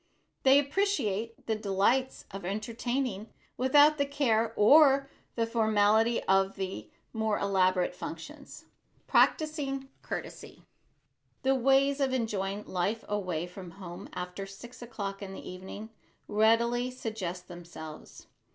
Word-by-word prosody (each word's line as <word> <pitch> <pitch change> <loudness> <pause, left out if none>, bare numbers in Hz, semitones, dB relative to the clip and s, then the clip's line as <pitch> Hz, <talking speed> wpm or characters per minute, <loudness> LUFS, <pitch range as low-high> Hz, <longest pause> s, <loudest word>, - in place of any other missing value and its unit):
They 270 +1 +6
appreciate 280 - -1
the 225 - 0
delights 215 +6 0
of 195 -1 -7
entertaining 225 +2 -3 0.3
without 290 +4 +5
the 285 - +3
care 230 -6 +1
or 275 +3 +6 0.2
the 230 - +1
formality 220 0 +2
of 195 +1 +2 0.5
more 220 -2 0
elaborate 185 -2 +2
functions. - - -9 0.4
[Sidenote: - - -43
PRACTISING 280 -4 +1
COURTESY] - - -7 0.8
The 265 +1 +3
ways 270 +2 +3
of 270 -2 +1
enjoying 210 -4 -2
life 195 +5 -2
away 180 -5 -2
from 180 0 -10
home 175 -3 -9
after 180 +2 -5
six 235 +6 -12
o'clock 200 -4 -5
in 195 -1 -7
the - - -9
evening, 190 +4 -8 0.4
readily 235 +3 +2
suggest 215 -8 -5
themselves. 170 -3 -10
220 Hz, 115 wpm, -29 LUFS, 195-260 Hz, 0.8 s, They